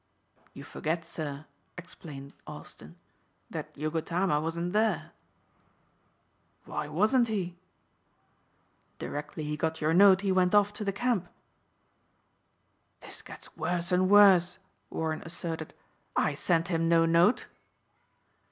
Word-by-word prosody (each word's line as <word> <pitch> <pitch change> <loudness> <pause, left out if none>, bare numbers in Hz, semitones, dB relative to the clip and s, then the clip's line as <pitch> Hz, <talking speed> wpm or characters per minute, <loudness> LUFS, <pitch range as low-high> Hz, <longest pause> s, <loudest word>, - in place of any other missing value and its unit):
"You - - -9
forget, 165 +1 -3
sir," 150 -3 -5 0.3
explained 145 -6 -10
Austin, - - -11 0.6
"that - - -6
Yogotama 160 +2 0
wasn't 170 +3 -3
there." 215 -2 +1 1.5
"Why 150 - -4
wasn't 215 - +2
he?" 185 -5 -3 1.4
"Directly 150 +1 -5
he 150 0 -3
got 160 +1 -2
your 155 +1 +1
note 190 +1 +7
he 200 -1 0
went 185 +1 +3
off 205 0 +4
to 210 - -5
the 200 - 0
camp." 205 -4 -1 1.7
"This - - -7
gets - - -12
worse 175 0 -1
and 185 +1 +3
worse," 195 -4 +6 0.3
Warren 160 -1 -3
asserted. 165 -1 -5 0.4
"I - - +2
sent 170 0 +1
him 165 -2 +1
no 165 -1 +5
note." 170 +7 +3
170 Hz, 115 wpm, -29 LUFS, 160-195 Hz, 1.7 s, note